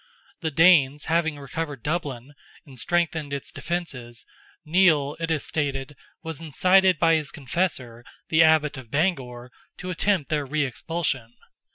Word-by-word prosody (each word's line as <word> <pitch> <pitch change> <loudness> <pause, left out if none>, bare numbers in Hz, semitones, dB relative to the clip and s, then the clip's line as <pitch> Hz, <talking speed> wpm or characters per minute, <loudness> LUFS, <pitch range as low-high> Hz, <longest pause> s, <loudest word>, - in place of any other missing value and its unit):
The 160 - -2
Danes 150 -3 +4
having 160 -2 0
recovered 145 -2 -5
Dublin, 145 -5 -3 0.3
and 135 -4 -11
strengthened 165 -1 -1
its 140 -1 -5
defences, 130 -10 -5 0.4
Nial, 155 -4 +3
it 165 0 -2
is 160 -3 -1
stated, 140 -2 -3 0.3
was 160 -3 -5
incited 185 +4 +3
by 165 +1 +4
his 155 -3 0
confessor, 130 -5 -3 0.3
the 160 0 +4
Abbot 155 -3 +4
of 125 -4 -13
Bangor, 130 -6 -1 0.3
to 185 - -5
attempt 180 -3 0
their 150 -1 +1
re 150 +2 -1
expulsion. 135 -3 -3
150 Hz, 140 wpm, -25 LUFS, 135-165 Hz, 0.4 s, Danes